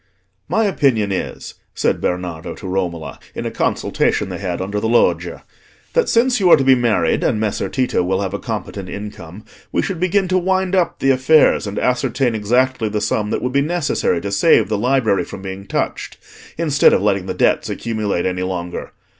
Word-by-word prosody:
"My 225 - +2
opinion 135 - +1
is," 95 - -4 0.2
said - - 0
Bernardo 90 -2 -3
to - - -9
Romola, 90 -4 -3 0.2
in - - -4
a - - -2
consultation - - 0
they - - -5
had 90 -3 -3
under 100 +2 -2
the 110 - -1
loggia, 120 - +1 0.5
"that 485 -2 +2
since 245 +1 +3
you 185 -3 +3
are - - +8
to 135 - 0
be 135 0 +6
married, 120 -4 +1
and 105 - +1
Messer 105 -2 -1
Tito 130 -7 0
will 95 +2 0
have 95 - -4
a - - -3
competent 95 -3 -5
income, 100 -2 -8 0.3
we - - 0
should 190 -4 -3
begin 185 +2 +1
to 185 0 +3
wind 190 +1 0
up 185 -3 +1
the 135 - +2
affairs, 130 -2 +4
and 100 - -5
ascertain 125 0 0
exactly 120 +2 +1
the 105 0 -1
sum 105 0 -1
that - - -2
would 125 0 -2
be 140 - +3
necessary 155 - 0
to 100 - -4
save 100 - +4
the 110 - 0
library 115 -6 +2
from 95 - -9
being 95 +1 -7
touched, - - -3 0.4
instead 155 -3 +4
of - - +2
letting 100 -2 +1
the - - -3
debts - - +1
accumulate 110 -6 -2
any 90 0 -1
longer. 90 -1 -4
110 Hz, 195 wpm, -19 LUFS, 95-140 Hz, 0.5 s, are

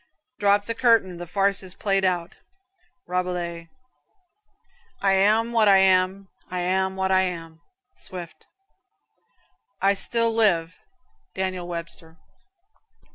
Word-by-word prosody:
"Drop 205 0 +3
the 230 - -2
curtain, 230 -7 +2
the 175 0 -8
farce 195 +2 +1
is 185 -1 -9
played 195 -1 0
out." 175 -2 -1 0.7
Rabelais. 175 -2 -3 1.3
"I 195 - +2
am 215 +4 +3
what 225 -2 +3
I 195 -1 +7
am. 190 +1 +2 0.2
I 180 0 -3
am 190 +1 0
what 190 0 -1
I 190 0 +4
am." 165 -3 -5 0.3
Swift. 175 -3 -10 1.3
"I 195 +1 +3
still 230 +3 0
live." 180 -7 +1 0.6
Daniel 185 -2 -3
Webster. 165 -1 -8
190 Hz, 115 wpm, -24 LUFS, 175-200 Hz, 1.3 s, I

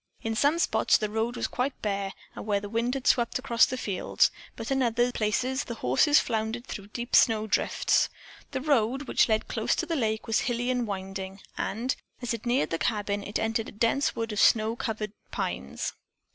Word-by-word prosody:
In 225 - -1
some 285 +7 +3
spots 340 - +3
the 215 -1 -3
road 225 +2 -1
was - - -2
quite 255 +2 -2
bare 200 -2 -1 0.2
where 205 -1 -1
the 205 - -7
wind 235 +4 0
had 270 -1 -4
swept 240 -4 +3
across 240 -3 +3
the 255 - -3
fields, 200 -6 +1 0.2
but 225 +3 -6
in 270 0 +2
other 240 0 +2
places 245 +5 0
the 235 - -5
horses 215 - +4
floundered 225 +1 -2
through 200 -6 -7
deep 235 +3 -2
snow 220 -2 +5
drifts. 215 - +2 0.4
The 260 - -3
road, 265 -2 +2
which - - +3
led 220 0 +1
close - - 0
to - - -1
the 330 - -2
lake, 220 -5 -1
was 225 - +2
hilly 245 +1 0
and 245 -2 0
winding, 195 -1 -5 0.2
and, 235 +6 -1 0.2
as 245 -1 -2
it 230 +1 -5
neared 240 -11 +1
the 165 - -1
cabin, 205 -2 -1
it 205 +1 -3
entered 225 0 -1
a - - -11
dense 230 +6 +1
wood 225 0 -2
of 210 - -2
snow 220 +1 +4
covered 215 -3 -3 0.2
pines. - - -3
225 Hz, 200 wpm, -28 LUFS, 210-250 Hz, 0.4 s, snow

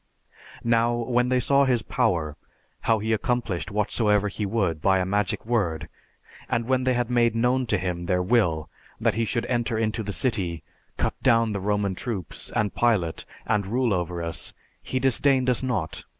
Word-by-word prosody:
"Now, 115 0 +2
when 120 +1 +1
they 130 0 +3
saw 140 +2 +3
his 125 -4 +1
power, 75 -4 0 0.4
how 115 - +2
he 110 +1 -1
accomplished 110 -4 -1
whatsoever 105 0 +1
he 100 +1 -3
would 95 -7 0
by 95 +2 +4
a 90 - 0
magic 100 +2 0
word, 100 -10 -1 0.6
and 115 - 0
when 130 +1 +1
they 130 -1 +2
had 120 0 -1
made 120 -2 +3
known 125 +2 +1
to 105 - +2
him 90 -2 -3
their 90 -1 +1
will, 90 -7 +2 0.3
that - - +2
he 115 +1 0
should 115 +2 -1
enter 120 -2 0
into 110 0 -1
the 105 -1 -4
city, 95 - -1 0.3
cut - - 0
down 115 -3 +3
the 100 - -2
Roman 100 -1 0
troops, 95 -3 -4
and 105 -2 +1
Pilate 105 -9 +1 0.2
and 100 -2 0
rule 120 +1 +1
over 90 -1 -2
us, 85 0 -5 0.3
he 130 - -2
disdained 130 0 +3
us 125 - 0
not. 110 -11 -2
110 Hz, 180 wpm, -25 LUFS, 95-120 Hz, 0.6 s, by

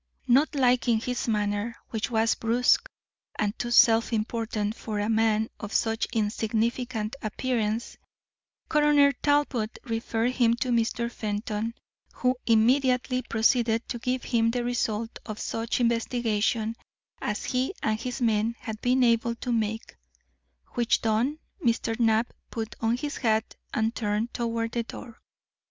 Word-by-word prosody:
Not 275 +5 +4
liking 245 -3 +3
his 250 +2 -3
manner, 210 +1 -1 0.2
which 220 -2 -2
was 225 -1 +2
brusque 245 - +2 0.5
and 210 -1 0
too 240 - -2
self 230 -1 +5
important 220 -1 -1
for 215 -3 -5
a 205 - 0
man 220 0 +2
of 205 -1 -6
such 225 0 +1
insignificant 225 +2 -1
appearance, 225 0 -2 0.7
Coroner 295 -2 +5
Talbot 280 -5 0
referred 230 -1 -1
him 235 -2 +3
to 250 +2 -2
Mr. 235 0 0
Fenton, 215 +1 -3 0.4
who 255 0 +1
immediately 250 +2 +3
proceeded 230 0 +1
to 240 - -3
give 250 +1 -1
him 230 -2 +2
the 240 +1 -1
result 230 -2 -2
of 215 -2 -5
such 225 +2 -2
investigations 230 -1 0 0.4
as 210 0 -2
he 255 +4 0
and 215 0 +1
his 250 +1 -3
men 225 0 +1
had 220 -1 -7
been 255 +1 +3
able 235 0 +2
to 245 - -4
make; 225 -1 -2 0.7
which 240 -2 +1
done, 230 +7 +1 0.3
Mr. 230 -1 0
Knapp 225 0 +2 0.2
put 225 -1 -5
on 230 +1 +1
his 290 +3 -4
hat 220 -2 0 0.2
and 220 +1 0
turned 215 +1 -1
toward 230 -1 -2
the 235 - -1
door. 230 0 -10
230 Hz, 140 wpm, -27 LUFS, 220-245 Hz, 0.7 s, self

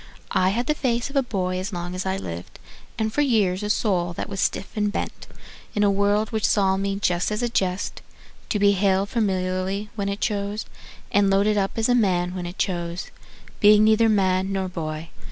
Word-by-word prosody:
I 185 - +3
had 235 +5 -1
the 300 - +2
face 250 -2 -1
of - - -13
a 275 - +4
boy 185 -7 -2
as 190 +4 -4
long 175 -1 -4
as 185 +1 -3
I 190 0 0
lived, 85 - -7 0.4
And 220 -1 -1
for 295 - +2
years 210 -9 +2
a 210 - -3
soul 180 -5 +1
that - - -5
was 195 -1 -5
stiff 195 - -1
and 210 -1 +1
bent, - - -5 0.5
In 210 - +2
a 200 - +4
world 205 +2 +1
which 220 -2 +1
saw 195 -2 +3
me 195 0 -1
just 180 -1 0
as 210 +3 -1
a 240 - +1
jest, 190 -3 -1 0.5
To - - +1
be 200 0 +5
hailed 195 0 +2
familiarly 190 -1 -1
when 200 -2 -2
it 200 +1 -3
chose, 205 0 -2 0.5
And 200 -1 +4
loaded 200 +2 +3
up 195 -1 0
as 225 - +2
a 245 - +3
man 180 -6 +2
when 180 -2 -4
it 175 - -8
chose, 175 -2 -2 0.5
Being 210 0 +7
neither 220 +1 +4
man 190 -2 +2
nor 190 -1 -1
boy. 160 -2 -5
200 Hz, 210 wpm, -24 LUFS, 185-210 Hz, 0.5 s, Being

